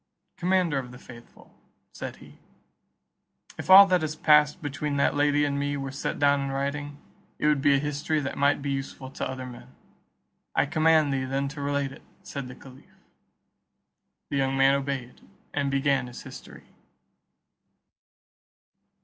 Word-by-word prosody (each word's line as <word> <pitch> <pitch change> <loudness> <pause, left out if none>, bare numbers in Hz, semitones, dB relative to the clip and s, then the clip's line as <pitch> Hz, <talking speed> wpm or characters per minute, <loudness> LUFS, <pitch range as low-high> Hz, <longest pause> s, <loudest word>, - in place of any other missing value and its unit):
"Commander 180 -5 +1
of 125 -2 -7
the 125 - -11
faithful," 120 -1 -15 0.4
said - - -6
he, - - -17 1.2
"if - - -7
all 195 +1 +11
that 185 -3 +2
has 155 -1 -3
past 150 -1 +4
between 145 0 -3
that 140 - +2
lady 145 0 +2
and 140 -1 -1
me 145 0 -1
were 135 -1 -5
set 140 - -4
down 140 -1 +3
in 140 - -3
writing, 140 +1 -3 0.4
it - - -3
would 150 -2 +3
be 140 0 +4
a - - +4
history 150 +2 -1
that 140 -1 -4
might 140 0 +2
be 140 - -2
useful 135 -1 -5
to - - -4
other 130 -1 -6
men." 120 - -12 0.8
"I - - +3
command 155 -1 +3
thee 130 -1 -1
then 135 +1 -1
to 145 0 -8
relate 140 -1 -1
it," - - -13 0.2
said 140 -3 -6
the 125 - -10
caliph. 130 -1 -17 1.3
The 140 - 0
young 135 0 0
man 135 0 +5
obeyed, 135 -3 -3 0.3
and 140 -1 0
began 135 -2 +1
his 120 - -10
history. - - -12
140 Hz, 160 wpm, -26 LUFS, 135-145 Hz, 1.3 s, all